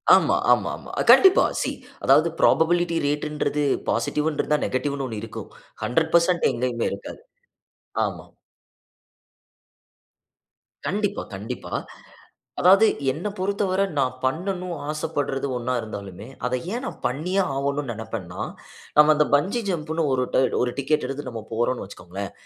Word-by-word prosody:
ஆமா, - - +3 0.2
ஆமா, - - +3
ஆமா. - - -11 0.2
கண்டிப்பா 380 -1 +7 0.2
சி - - -1 0.3
அதாவது - - +5
புரோபபிலிட்டி 170 +1 +3
ரேட்ன்றது 150 0 -1 0.3
பாசிட்டிவ்ன்னு 150 0 0
இருந்தா 150 0 +1
நெகட்டிவ்ன்னு 140 +1 -2
1 110 -3 -5
இருக்கும். 115 - -7 0.3
100% 170 +5 +2
எங்கயுமே 120 -1 -1
இருக்காது. - - -8 0.8
ஆமா. - - -5 2.6
கண்டிப்பா, 205 0 -1
கண்டிப்பா. 100 +3 -6 0.9
அதாவது 195 +5 +7 0.3
என்னை 170 +9 -4
பொறுத்தவரை 195 0 0
நான் 130 -2 +1
பண்ணனும் 180 +4 -2
ஆசப்படுறது 145 -3 -2
ஒண்ணா 125 +1 -2
இருந்தாலுமே 100 -1 -8 0.2
அதை 125 0 0 0.2
ஏன் 250 +2 -3
நான் - - -6
பண்ணியே 175 +10 0
ஆகணும்ன்னு 140 -1 -1
நினைப்பேன் 110 -3 -6
நான். 90 - -4 0.5
நம்ம 150 +1 +8
அந்த 150 0 +3
பங்கி 190 +11 +1
ஜம்ன்னு 160 -2 -1 0.6
ஒரு 125 0 +1
டிக்கெட் 145 0 +1
எடுத்து 135 0 -5
நம்ம 115 -2 -6
போறோம்ன்னு 120 +2 0
வச்சுக்கோங்களேன். 95 +1 -7
150 Hz, 120 wpm, -24 LUFS, 125-175 Hz, 2.6 s, நம்ம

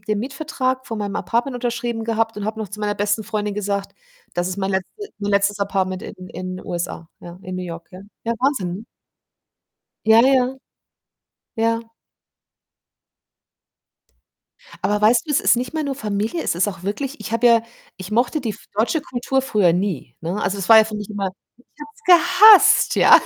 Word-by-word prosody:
den 210 0 -2
Mietvertrag 260 0 -3
von 225 - -5
meinem 205 -1 -4
Apartment 235 +8 -1
unterschrieben 240 -1 -3
gehabt 225 0 -1
und 210 - -4
habe 215 +1 -4
noch 215 -2 -4
zu 210 +2 -8
meiner 205 0 -1
besten 205 +2 0
Freundin 210 -1 -3
gesagt: 200 -1 -3 0.4
„Das 175 +1 -1
ist 185 - -4
mein 195 0 -2
letzte 190 - -4
mein 205 -1 -3
letztes 200 0 +1
Apartment 190 -2 -1
in - - -8
in 185 0 -6
'n - - -12
USA.“ 170 -1 -5
Ja, 175 0 -11
in 185 - -7
New 185 - -4
York, 170 -1 -8
ja. 185 - -10 0.2
Ja 230 - 0
Wahnsinn, 245 -10 0
ne? 205 +5 -8 1.2
Ja, 220 +1 +7
ja. 260 0 +2 1.0
Ja. 230 0 -1 2.9
Aber 205 +1 +1
weißt 230 +7 +3
du, - - -5
es 290 - +3
ist - - +4
nicht 250 +4 -4
mehr 315 -1 -1
nur 280 -1 -2
Familie, 215 +4 -2
es - - -1
ist 180 +4 +1
auch 190 -3 -7
wirklich 265 +9 -4
Ich 220 - -7
habe 230 +1 +2
ja 230 -1 +5 0.3
ich 185 +1 -9
mochte 240 +7 +1
die 235 - -3
f 210 - -10
deutsche 230 +10 +1
Kultur 265 -3 -2
früher 210 -9 +2
nie, 175 -9 -3
ne? 175 +6 -3
Also, 190 +3 -1
es 190 - -4
war 225 -1 +9
ja 220 - +6
für 215 -1 -6
mich 210 -1 -6
immer 200 -2 -2 0.3
Ich 250 - -25 0.2
habe 295 0 -9
es - - -24 0.3
gehasst, 410 +2 +7
ja. - - +7
215 Hz, 190 wpm, -21 LUFS, 195-245 Hz, 2.9 s, war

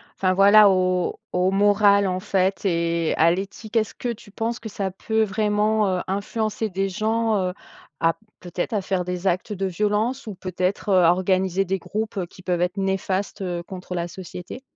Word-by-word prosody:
enfin, 185 -1 +1
voilà, 200 +2 +7
aux 185 -1 +1
aux 180 +1 +2
morales, 200 0 +4
en 185 0 -1
fait, 190 0 0
et 170 -2 +1
à 165 +1 +5
l'éthique, 200 +5 -5
est-ce 220 -2 +1
que - - -5
tu 210 -2 -11
penses 230 +3 -3
que 225 - -7
ça 195 -2 -3
peut 220 +4 -1
vraiment, 210 +1 +1
heu, - - -2
influencer 215 +3 -2
des 195 +1 -1
gens, 220 +3 0
heu, - - -6 0.5
à 165 0 +2 0.2
peut-être 175 +5 -4
à 210 - +1
faire 190 -1 -1
des 180 +1 -3
actes 185 +4 0
de 195 -1 -2
violence 210 +8 0
ou 210 - -5
peut-être, 185 +2 -2
heu, 185 -2 +5
à 165 - +6
organiser 185 +1 +1
des 190 +1 -1
groupes, 215 +3 -4
heu, 185 - -1
qui 185 - -16
peuvent 180 -2 -1
être 180 +2 -1
néfastes, 195 +1 -1
heu, 175 -2 -3
contre 185 0 -8
la 175 -1 -2
société? 180 +6 -9
195 Hz, 190 wpm, -23 LUFS, 180-210 Hz, 0.5 s, voilà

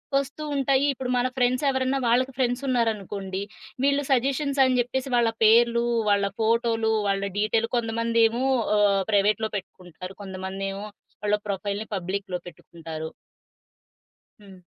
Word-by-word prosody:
వస్తూవుంటాయి. 275 -1 0
ఇప్పుడు 255 -1 -5
మన 245 +1 +2
ఫ్రెండ్స్ 250 +2 +2
ఎవరైనా 265 0 0
వాళ్ళకి 255 +3 +2
ఫ్రెండ్స్ 245 0 0
ఉన్నారనుకోండి, 205 -5 -1 0.4
వీళ్ళు 280 +1 +2
సజెషన్స్ 275 +2 +1
అని 255 -1 +2
చెప్పేసి 260 +2 -1
వాళ్ళ 235 -1 +3
పేర్లు, 235 +2 +5 0.3
వాళ్ళ 200 -1 +3 0.2
ఫోటోలు, 225 0 +2 0.2
వాళ్ళ 195 0 0 0.2
డీటెయిల్, 225 +2 +1
కొంతమందేమో 230 +1 +1 0.3
ఆహ్, 200 -1 +3
ప్రైవేట్‌లో 210 +2 +2
పెట్టుకుంటారు. 185 0 -10
కొంతమంది 190 0 -6
ఏమో 200 +2 -6 0.4
వాళ్ళ 210 0 +2
ప్రొఫైల్‌ని 200 +2 -3
పబ్లిక్‌లో 190 0 -3
పెట్టుకుంటారు. 160 -2 -8 1.3
హ్మ్. 195 -2 -14
225 Hz, 120 wpm, -25 LUFS, 200-255 Hz, 1.3 s, పేర్లు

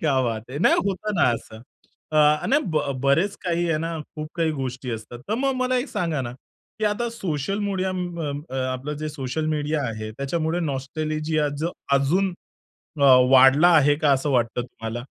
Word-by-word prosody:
क्या 140 -5 +2
बात 115 -1 -3
है 140 - -4
नाही - - +4
होतं 200 +2 -2
ना 130 - +4
असं. 110 -1 -10 0.5
अ. - - +1 0.3
आणि 280 - +3
ब 155 - +2 0.2
बरेच 165 +9 +2
काही 175 -1 0
आहे 155 - +1
ना 165 +1 -3 0.2
खूप 155 0 -5
काही 165 -2 +1
गोष्टी 130 -3 -4
असतात. 115 +1 -6
तर 215 - +1
मग 270 +3 0
मला 255 0 +1
एक 260 - -3
सांगा 165 -5 -1
ना, 120 -1 -5 0.5
की 215 - -1
आता 210 +3 0
सोशल 195 -4 -3
मीडिया 190 -1 -1
म 175 -2 -4
अं, 145 0 -3
अ, 130 - -4 0.2
आपलं 135 +4 -4
जे 155 - -2
सोशल 150 +1 -3
मीडिया 150 0 -1
आहे 110 -1 -5
त्याच्यामुळे 160 +7 -2
नॉस्टॅल्जिया 155 +2 -2 0.5
अजून 180 +8 +1 0.7
अ, - - +4 0.3
वाढला 135 +5 +7
आहे 145 -1 +5
का 145 - +5
असं 135 +2 0
वाटतं 120 -2 +1
तुम्हाला? 120 0 -7
150 Hz, 180 wpm, -24 LUFS, 130-175 Hz, 0.7 s, वाढला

